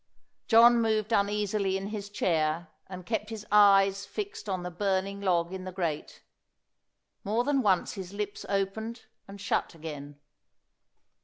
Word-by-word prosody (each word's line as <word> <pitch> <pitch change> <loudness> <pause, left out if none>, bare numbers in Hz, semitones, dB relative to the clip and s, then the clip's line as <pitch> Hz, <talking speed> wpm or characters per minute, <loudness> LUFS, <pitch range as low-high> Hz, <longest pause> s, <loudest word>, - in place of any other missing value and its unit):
John 235 +1 +7
moved 220 0 0
uneasily 200 -1 +1
in 195 +1 -5
his 205 -2 -6
chair, 165 -4 0 0.2
and 185 -1 -9
kept 220 0 -2
his 220 -2 -7
eyes 195 -1 +5
fixed 415 - -6
on 185 -2 -2
the 180 - -5
burning 195 +1 -1
log 175 -2 +1
in 190 -1 -5
the 185 - -6
grate. 170 -5 -4 1.0
More 220 +4 0
than 275 0 +1
once 190 -6 +1
his 190 -3 -7
lips 205 0 -5
opened 220 +4 -2 0.2
and 200 0 -10
shut 200 -3 -1
again. 145 -3 -8
200 Hz, 145 wpm, -28 LUFS, 185-215 Hz, 1.0 s, John